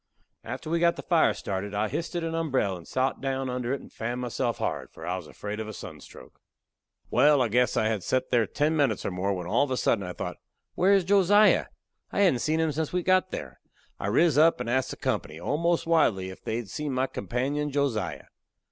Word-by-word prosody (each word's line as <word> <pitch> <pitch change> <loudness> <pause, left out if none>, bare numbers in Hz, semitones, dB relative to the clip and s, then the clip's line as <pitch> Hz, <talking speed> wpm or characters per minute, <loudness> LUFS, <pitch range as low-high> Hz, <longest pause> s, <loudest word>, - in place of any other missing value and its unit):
After 130 +7 -6
we 170 - +2
got 170 0 +3
the - - -8
fire 170 -3 +3
started, 100 +1 -4
I 105 +1 +1
histed 170 - -3
a - - -3
umberell 135 - 0
and 85 -2 -11
sot 130 +1 -1
down 135 -1 -2
under 125 -1 -2
it 140 - -2
and - - -15
fanned 120 +2 -3
myself 120 -1 -2
hard, - - -3
for - - -11
I 90 - -1
was 90 -4 -7
afraid 105 +1 -6
of 110 - -4
a 110 - -6
sunstroke. 80 -8 -11 0.7
Wal, 145 -1 +5
I 125 - +3
guess 125 +2 +2
I - - +2
had 110 -2 0
set 130 +7 -1
there 120 -3 +3
ten 150 +2 0
minutes 135 -9 +1
or - - -1
more, 90 +2 -1
when 90 -3 -3
all 115 +10 +2
of 145 - -2
a 130 - -1
sudden 105 -5 +1
I 90 -1 -5
thought, - - -5 0.4
Where 190 +3 +3
is 195 -2 +4
Josiah? 205 +3 +4 0.4
I - - 0
hadn't 180 -11 +4
seen 155 +5 0
him 160 -1 +1
since 155 +1 -2
we 180 - 0
had - - -14
got 185 0 +3
there. 65 - -7 0.4
I - - -3
riz 150 +8 +3
up 165 -2 +5
and 125 - -4
asked 130 +2 +1
the - - -6
company, 75 +1 -2
almost 170 - 0
wildly, 110 - +2
if 95 - -13
they 110 - -2
had 115 -4 -4
seen 145 +6 -3
my 130 +1 +1
companion, 135 +4 -2
Josiah. 120 - -1
130 Hz, 230 wpm, -27 LUFS, 105-160 Hz, 0.7 s, Wal